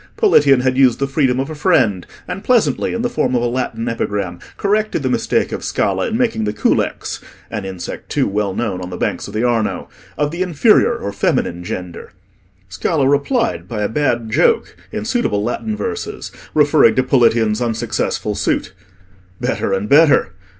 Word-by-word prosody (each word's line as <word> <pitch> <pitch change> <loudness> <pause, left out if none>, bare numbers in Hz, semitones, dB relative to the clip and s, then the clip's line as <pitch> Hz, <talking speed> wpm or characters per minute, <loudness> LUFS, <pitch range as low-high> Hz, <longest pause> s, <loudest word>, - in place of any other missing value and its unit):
Politian 145 - +5
had 130 0 +1
used 130 -3 +5
the 140 - 0
freedom 135 -2 +1
of 135 +4 -3
a - - -4
friend, 105 - +1 0.2
and 195 - -5
pleasantly, 240 -1 +2
in 230 0 -2
the - - +2
form 130 - 0
of 120 - +1
a - - +2
Latin 120 -2 -3
epigram, 100 -6 -3 0.2
corrected 210 +1 0
the - - 0
mistake - - 0
of - - -4
Scala - - 0
in 225 - -1
making 230 - 0
the 105 - -1
culex 105 - -1 0.3
(an 105 -3 -4
insect 95 -2 -7
too - - +1
well 100 -1 -1
known 100 -6 -2
on 90 - -6
the 90 - -6
banks - - -2
of 100 - -9
the 110 - 0
Arno) 120 -3 0 0.3
of 145 0 0
the 170 +2 -4
inferior 185 +7 +3
or 100 - -5
feminine 90 -3 -1
gender. 90 +1 -7 0.5
Scala 135 - 0
replied 185 - 0
by 105 -3 -3
a - - +1
bad 120 -4 -1
joke, 460 -1 +2 0.2
in - - -4
suitable 160 - 0
Latin 215 - -3
verses, 435 - -5 0.2
referring 150 0 +5
to 130 - +3
Politian's 115 -4 +2
unsuccessful 115 -2 -2
suit. 95 - -1 0.7
Better - - -1
and 95 +2 -1
better. 150 +4 +5
125 Hz, 180 wpm, -18 LUFS, 105-160 Hz, 0.7 s, Politian